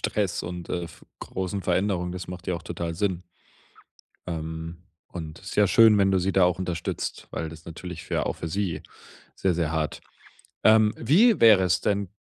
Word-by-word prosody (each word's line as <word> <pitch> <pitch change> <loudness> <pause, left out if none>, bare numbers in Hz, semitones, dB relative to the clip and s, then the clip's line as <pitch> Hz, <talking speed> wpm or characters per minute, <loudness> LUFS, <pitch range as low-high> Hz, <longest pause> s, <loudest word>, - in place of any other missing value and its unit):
Stress 100 -4 -1
und, 85 0 -6
äh, 85 - -2
f 80 - -13
großen 95 +1 -4
Veränderungen. 90 -2 0
Das 90 -1 -7
macht 90 -1 -8
ja 90 - 0
auch 85 - -6
total 85 -1 -4
Sinn. 95 -1 -1 1.1
Ähm, 80 0 -5 0.3
und 80 -2 -8
ist 100 +2 -8
ja 105 -1 +5
schön, 110 +2 +6
wenn 95 -1 +3
du 95 - +3
sie 95 +2 0
da 95 -1 +4
auch 90 0 +2
unterstützt, 90 -2 -4
weil 80 -1 -4
das 80 0 -11
ist - - -29
natürlich 85 0 -8
für - - -1
auch - - -1
für 85 - -6
sie 95 0 -2 0.5
sehr, 95 -2 +1
sehr 80 -2 -1
hart. 80 -2 -2 0.6
Ähm. 110 -1 +5
Wie 195 - +4
wäre 105 -5 +7
es 90 -3 +2
denn? 100 -2 0
90 Hz, 190 wpm, -26 LUFS, 85-100 Hz, 1.1 s, wäre